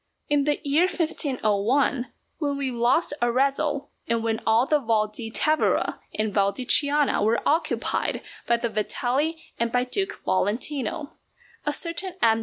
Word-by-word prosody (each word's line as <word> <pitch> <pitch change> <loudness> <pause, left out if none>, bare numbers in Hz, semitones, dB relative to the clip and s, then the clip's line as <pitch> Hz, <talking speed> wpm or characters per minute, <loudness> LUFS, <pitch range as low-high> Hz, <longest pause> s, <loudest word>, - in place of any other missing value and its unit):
In 290 -1 +2
the 295 0 +1
year 310 +6 +4
1501, 260 - 0 0.3
when 285 -3 -1
we 275 -2 -2
lost 245 +7 +2
Arezzo, 275 +4 +1 0.2
and 230 0 0
when 225 -1 -1
all 225 +3 +4
the 300 +2 +2
Val 225 -4 +1
di 225 +2 -5
Tevere 310 +7 +1 0.2
and 215 -1 -1
Val 200 -1 +3
di 250 +6 -5
Chiana 290 -2 +3
were 220 +2 +2
occupied 320 +3 0 0.2
by 235 - +3
the 235 0 -2
Vitelli 255 +9 -1 0.2
and 235 0 0
by 245 0 +2
Duke 385 +10 -2
Valentino, 280 - -1 0.5
a - - +3
certain 345 +4 -3
M. 225 -8 +4
260 Hz, 150 wpm, -25 LUFS, 225-295 Hz, 0.5 s, year